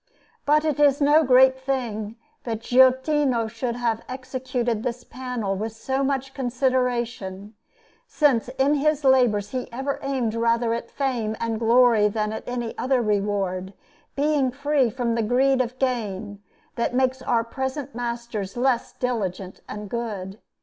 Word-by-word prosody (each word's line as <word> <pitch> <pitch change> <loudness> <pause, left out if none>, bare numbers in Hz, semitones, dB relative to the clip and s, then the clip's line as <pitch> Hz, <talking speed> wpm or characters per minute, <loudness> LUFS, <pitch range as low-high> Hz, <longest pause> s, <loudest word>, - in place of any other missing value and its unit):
But 300 +1 +4
it 300 -2 0
is 285 -1 +4
no 295 +2 +5
great 260 0 +5
thing 235 -5 -3 0.3
that 225 -2 -4
Giottino 260 0 +3
should 230 +2 -3
have 235 -2 -1
executed 255 -3 -3
this 245 +1 -4
panel 245 -6 -4
with 215 +3 -4
so 265 +4 -2
much 270 -1 -1
consideration, 245 -6 -1 0.5
since 265 -6 +2
in 275 +2 +3
his 300 0 +1
labours 245 -7 +3
he 255 -1 -4
ever 270 +4 -3
aimed 260 -5 -1
rather 230 0 +1
at 235 0 -4
fame 240 -6 -2
and 230 -1 -2
glory 230 -2 +5
than 215 0 -2
at - - -7
any 240 -2 -3
other 260 0 +2
reward, 200 -3 -1 0.4
being 285 -2 +2
free 280 -1 +1
from 235 0 -1
the 230 - 0
greed 255 +4 +3
of 250 0 -4
gain, 210 -6 -2 0.4
that 235 +1 -1
makes 260 0 +1
our 235 -2 +1
present 265 +3 -4
masters 235 -4 -4
less 250 -1 +1
diligent 195 -7 -3
and 210 0 -6
good. 205 -3 -5
245 Hz, 145 wpm, -24 LUFS, 225-265 Hz, 0.5 s, no